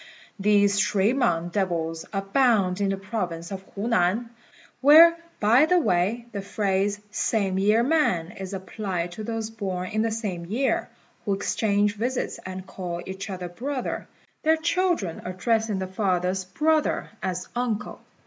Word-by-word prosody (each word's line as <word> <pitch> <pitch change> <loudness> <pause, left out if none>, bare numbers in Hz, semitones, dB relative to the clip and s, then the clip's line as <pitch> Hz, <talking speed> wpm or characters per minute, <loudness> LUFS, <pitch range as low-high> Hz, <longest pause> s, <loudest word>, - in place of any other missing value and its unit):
These 200 0 +3
shui 210 +2 +2
mang 175 -11 +1
devils 170 -4 -2
abound 195 -2 +2
in 200 - +2
the 195 - -1
province 185 -4 -4
of 190 -1 -5
Hunan, 220 +1 +1 0.5
where, 320 +5 +9 0.2
by 235 +8 +5
the 360 +2 +4
way, 220 - +1
the 200 -2 -4
phrase 200 0 0
"same 195 -5 0
year 210 +4 +4
man" 240 - +1
is 195 -3 -7
applied 190 -2 -4
to 215 +5 -7
those 225 0 -3
born 190 -4 -4
in 215 0 0
the 225 - +1
same 200 -7 -4
year, 255 +8 0 0.3
who 200 -2 0
exchange 205 +1 +1
visits 245 +4 -2
and 185 0 -6
call 175 -2 -5
each 190 +2 -6
other 185 -2 -4
brother, 255 +9 -4 0.3
their 320 +1 +3
children 335 - 0
addressing 215 +3 0
the 190 - -2
father's 185 -1 -1
"brother" 305 +10 +1
as 185 -1 -3
uncle. 240 -4 -2
200 Hz, 145 wpm, -25 LUFS, 185-230 Hz, 0.5 s, where